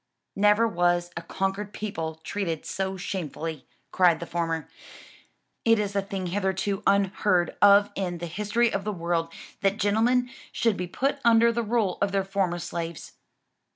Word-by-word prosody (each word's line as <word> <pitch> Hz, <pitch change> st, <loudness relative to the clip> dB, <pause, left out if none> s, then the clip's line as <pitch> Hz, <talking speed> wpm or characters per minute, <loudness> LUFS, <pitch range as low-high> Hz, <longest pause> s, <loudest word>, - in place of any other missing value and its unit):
"Never 210 Hz, +3 st, +4 dB
was 175 Hz, -2 st, +1 dB
a 170 Hz, -, -4 dB
conquered 195 Hz, +4 st, -3 dB
people 165 Hz, -7 st, -4 dB
treated 170 Hz, -6 st, -3 dB
so 190 Hz, 0 st, -3 dB
shamefully!" 165 Hz, -5 st, -5 dB, 0.2 s
cried 175 Hz, -3 st, +4 dB
the 170 Hz, -, -5 dB
former, 165 Hz, -2 st, -2 dB, 1.0 s
"it 225 Hz, -1 st, +5 dB
is 205 Hz, -1 st, -2 dB
a 200 Hz, -, +2 dB
thing 195 Hz, -1 st, -5 dB
hitherto 190 Hz, +2 st, -1 dB
unheard 195 Hz, -2 st, +2 dB
of 205 Hz, +1 st, +6 dB
in 180 Hz, -3 st, -3 dB
the 175 Hz, -, -5 dB
history 210 Hz, +7 st, 0 dB
of 195 Hz, -, -1 dB
the 210 Hz, -, -2 dB
world, 170 Hz, -2 st, -1 dB, 0.3 s
that 195 Hz, +1 st, +2 dB
gentlemen 240 Hz, +5 st, +2 dB, 0.2 s
should 230 Hz, -3 st, +1 dB
be 180 Hz, -1 st, -4 dB
put 275 Hz, +10 st, -1 dB
under 235 Hz, 0 st, +5 dB
the 235 Hz, +1 st, -1 dB
rule 220 Hz, -4 st, 0 dB
of 200 Hz, -1 st, +1 dB
their 195 Hz, -1 st, +1 dB
former 190 Hz, -3 st, 0 dB
slaves." 170 Hz, -1 st, -5 dB
195 Hz, 155 wpm, -26 LUFS, 175-210 Hz, 1.0 s, of